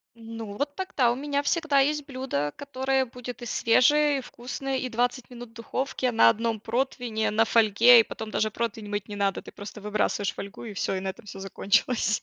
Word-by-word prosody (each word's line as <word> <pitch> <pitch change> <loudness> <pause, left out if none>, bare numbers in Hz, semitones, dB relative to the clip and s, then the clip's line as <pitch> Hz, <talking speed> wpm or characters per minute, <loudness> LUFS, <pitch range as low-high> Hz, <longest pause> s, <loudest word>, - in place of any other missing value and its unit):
Ну, 225 -2 -8
вот 285 0 -2
тогда 270 -10 +1
у - - -1
меня 285 +1 -2
всегда 310 -3 +2
есть 295 +1 +1
блюдо, 255 - -3
которое 265 -1 -1
будет 245 0 -9
и - - -5
свежее, 285 +6 +3
и - - -3
вкусное, 260 +2 -5
и 255 -1 -3
20 245 +2 -1
минут 245 -1 -10
в - - -24
духовке 255 +2 -2
на 115 - +6
1 225 0 -1
противне, 235 -1 -1
на 225 +2 +3
фольге, 230 +2 +6
и - - +6
потом 220 0 -7
даже 215 0 +1
противень 220 -1 -4
мыть 205 -1 -3
не 205 - -7
надо, 200 -1 0
ты - - -11
просто 205 +1 -9
выбрасываешь 205 -1 -1
фольгу 200 0 -8
и 210 - -7
всё, 190 - -1
и - - -1
на 190 - -3
этом 210 +4 -9
всё 195 - -8
закончилось. 205 +3 +1
235 Hz, 205 wpm, -26 LUFS, 215-265 Hz, -, на